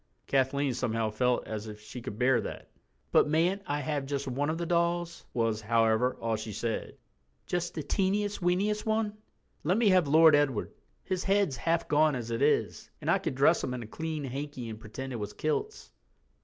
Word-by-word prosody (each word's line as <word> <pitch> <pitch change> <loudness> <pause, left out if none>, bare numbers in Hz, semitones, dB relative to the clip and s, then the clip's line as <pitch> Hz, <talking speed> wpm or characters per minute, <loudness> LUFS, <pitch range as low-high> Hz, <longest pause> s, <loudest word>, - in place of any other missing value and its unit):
Kathleen 135 0 +1
somehow 115 -3 -1
felt 125 +3 +1
as 110 0 -5
if 105 -1 -8
she 110 +4 -9
could 115 -4 -6
bear 125 0 +3
that. - - -8 0.4
"But - - +5
mayn't 170 +6 +2
I 145 +1 -1
have 145 -1 -2
just 140 0 -3
one 140 +3 -1
of 160 - -1
the 170 - -2
dolls" 170 0 0
was, 115 -2 0
however, 115 +2 +2
all 115 -1 0
she 110 0 -6
said, 115 +2 -3 0.5
"just 175 -1 -2
the 155 - -3
teeniest, 200 +6 0
weeniest 195 +4 +1
one? 220 -1 0 0.5
Let 180 +6 +2
me 225 -3 +4
have 185 -5 +4
Lord 160 +1 +7
Edward. 135 -7 0 0.3
His 185 -1 -2
head's 195 -7 +2
half 165 +7 0
gone 150 0 +3
as 120 -2 -5
it 115 - -2
is, 150 +1 +1
and 155 +2 0
I 195 - +3
could 175 -8 -3
dress 145 +6 +4
him 125 - -2
in 120 - -5
a - - -8
clean 160 +5 -4
hanky 135 -2 -5
and 110 -1 -7
pretend 130 +4 -7
it - - -3
was 105 -1 -5
kilts." 420 - -3
145 Hz, 195 wpm, -29 LUFS, 120-170 Hz, 0.5 s, Lord